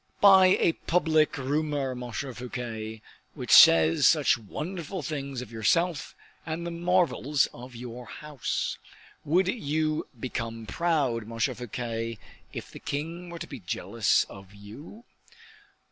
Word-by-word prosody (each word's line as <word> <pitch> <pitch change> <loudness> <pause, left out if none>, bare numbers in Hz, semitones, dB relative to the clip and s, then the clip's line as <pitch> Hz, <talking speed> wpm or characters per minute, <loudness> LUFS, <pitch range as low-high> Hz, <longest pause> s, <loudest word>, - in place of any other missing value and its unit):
"By 190 -2 +7
a - - +4 0.2
public 155 -3 +2
rumor, 145 0 -1
Monsieur 125 +2 -5
Fouquet, 115 -3 -6 0.3
which - - -5
says 80 0 +8
such - - +4
wonderful 160 - -6
things 140 -4 -4
of 115 - -13
yourself 155 +9 0 0.3
and 160 +1 -4
the 170 - -3
marvels 170 -5 +2
of 125 +1 -11
your 120 0 -8
house. 140 +6 -4 0.4
Would 175 +5 +2
you 155 -6 -1
become 115 -2 -4
proud, 140 -9 0
Monsieur 115 0 -1
Fouquet, 115 -1 -4 0.3
if - - -8
the - - -10
king 165 +5 -5
were 170 - -7
to - - -6
be 135 - -9
jealous 85 - +1
of 95 0 -13
you?" 115 - -12
140 Hz, 130 wpm, -27 LUFS, 115-165 Hz, 0.4 s, says